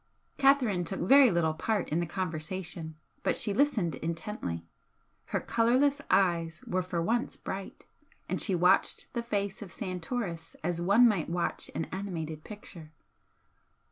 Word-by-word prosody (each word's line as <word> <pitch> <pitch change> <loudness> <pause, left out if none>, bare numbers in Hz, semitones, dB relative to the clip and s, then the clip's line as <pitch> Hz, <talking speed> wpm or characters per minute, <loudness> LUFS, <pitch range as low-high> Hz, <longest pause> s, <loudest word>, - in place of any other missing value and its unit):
Catherine 265 -10 +4
took 190 +3 -4
very 270 +8 +7
little 170 -4 +2
part 205 +5 -1
in 155 - +1
the 170 - -1
conversation, 170 -1 -4 0.3
but - - +1
she 205 - 0
listened 220 - +2
intently 160 - -4 0.6
her - - -1
colourless 260 +5 +2
eyes 170 -3 +2
were 185 +1 0
for 175 -2 -2
once 235 +6 0
bright, 195 0 -7 0.4
and - - -1
she 195 - +2
watched 180 +2 +2
the 235 - -1
face 200 -4 -2
of 195 -4 -8
Santoris 185 -2 -4
as 170 +1 -1
one 200 +7 +6
might 195 -9 0
watch 170 0 -2
an 165 - -1
animated 165 -5 -4
picture. 175 -7 -10
185 Hz, 140 wpm, -30 LUFS, 165-215 Hz, 0.6 s, very